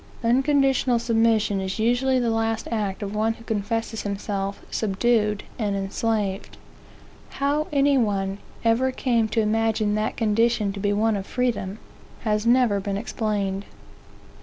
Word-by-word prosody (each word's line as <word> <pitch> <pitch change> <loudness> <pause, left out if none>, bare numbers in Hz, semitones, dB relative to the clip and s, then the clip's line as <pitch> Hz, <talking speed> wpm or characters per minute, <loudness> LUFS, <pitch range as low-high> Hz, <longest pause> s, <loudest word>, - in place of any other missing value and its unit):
Unconditional 265 0 +3
submission 225 -3 +2
is 190 0 -3
usually 245 +4 +2
the 240 -2 +1
last 225 0 -1
act 210 -3 -2
of 200 0 -4
one 220 +1 +1
who 230 - -15
confesses 225 +1 -2
himself 200 -1 -3
subdued 210 0 +1 0.2
and 205 -3 0
enslaved. 200 0 -2 0.8
How 290 +2 +1
any 280 -1 +3
one 195 -3 -1 0.3
ever 240 +3 +3
came 235 -4 +1
to 225 +1 +1
imagine 220 -1 +1
that 215 +1 -1
condition 225 -1 +2
to 200 - -6
be 205 +1 0
one 215 +1 +2
of 195 -1 -4
freedom, 235 -6 -1 0.4
has 215 0 0
never 240 -4 +4
been 195 0 -3
explained. 205 -3 -2
220 Hz, 135 wpm, -24 LUFS, 205-235 Hz, 0.8 s, never